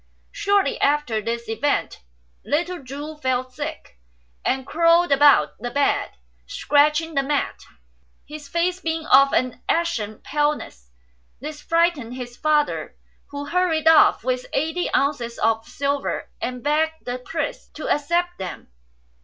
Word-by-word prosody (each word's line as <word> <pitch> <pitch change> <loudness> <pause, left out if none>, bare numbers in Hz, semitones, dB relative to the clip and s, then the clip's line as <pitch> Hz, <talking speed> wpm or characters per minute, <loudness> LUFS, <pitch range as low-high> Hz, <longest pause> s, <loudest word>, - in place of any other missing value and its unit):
Shortly 400 -1 +1
after 285 -7 +1
these 235 +2 -4
events 280 +6 -1 0.4
little 345 +1 -2
Chu 290 +4 -7
fell 255 -3 -1
sick, 290 - -7 0.4
and 265 0 0
crawled 335 +2 +3
about 285 0 +6
the 245 +3 -4
bed 280 +3 +1 0.4
scratching 300 +3 +2
the 275 - +2
mat, 285 +1 -1 0.7
his 295 0 -9
face 350 +3 0
being 325 -2 -3
of 275 +1 +6
an 255 0 0
ashen 235 -12 0
paleness. 295 - -2 0.5
This 295 +3 -7
frightened 330 -8 +1
his 245 -1 -7
father, 300 +1 0 0.3
who 285 0 -6
hurried 325 0 +1
off 320 -7 +6
with 250 0 -2
eighty 320 +5 -1
ounces 250 -5 0
of 225 0 0
silver, 280 0 -2
and 250 -1 -4
begged 315 +2 0
the 245 0 -3
priest 315 +2 -5
to 310 - -5
accept 345 +4 0
them. 185 - -7
290 Hz, 130 wpm, -22 LUFS, 255-320 Hz, 0.7 s, about